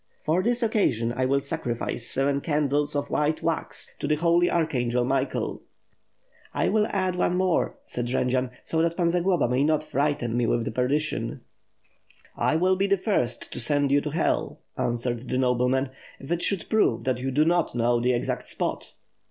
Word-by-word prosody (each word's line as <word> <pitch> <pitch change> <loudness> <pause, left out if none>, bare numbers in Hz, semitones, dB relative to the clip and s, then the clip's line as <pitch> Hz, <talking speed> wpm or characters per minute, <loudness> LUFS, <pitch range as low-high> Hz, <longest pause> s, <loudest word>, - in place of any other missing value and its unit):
For 160 +4 +2
this 240 +3 0
occasion, 120 - +1
I 130 0 +1
will 140 +1 +2
sacrifice 120 -6 -3
seven 140 +1 0
candles 145 -1 0
of 145 0 -2
white 150 +1 0
wax 165 -1 -3
to - - -2
the 150 - +2
Holy 170 +2 +3
Archangel 125 -7 0
Michael." 135 +1 -1 0.9
"I - - +1
will 215 0 +2
add 185 -2 -1
one 180 0 +1
more," 185 -2 +1
said 120 -1 -3
Jendzian, 125 0 0
"so 160 - 0
that 170 0 0
Pan 170 -2 +2
Zagloba 175 -4 +2
may 125 +3 +1
not 155 0 +2
frighten 145 -5 -1
me 120 -1 +1
with 115 -1 0
perdition." 140 +6 -1 0.9
"I - - +1
will 185 +3 +3
be 195 +2 +1
the 200 0 +3
first 150 - -1
to - - -4
send 145 +3 +2
you 145 +1 +4
to 150 - -3
Hell," 160 +3 -1 0.2
answered 120 0 -1
the 125 - 0
nobleman, 130 +1 +1 0.3
"if 135 - -9
it 175 0 0
should 195 -4 +2
prove 220 -1 +2
that 130 -2 0
you 130 +1 -2
do 145 +4 +2
not 170 -3 +1
know 120 0 +2
the 125 +1 +2
exact 120 - -2
spot." - - -4
145 Hz, 180 wpm, -26 LUFS, 125-170 Hz, 0.9 s, you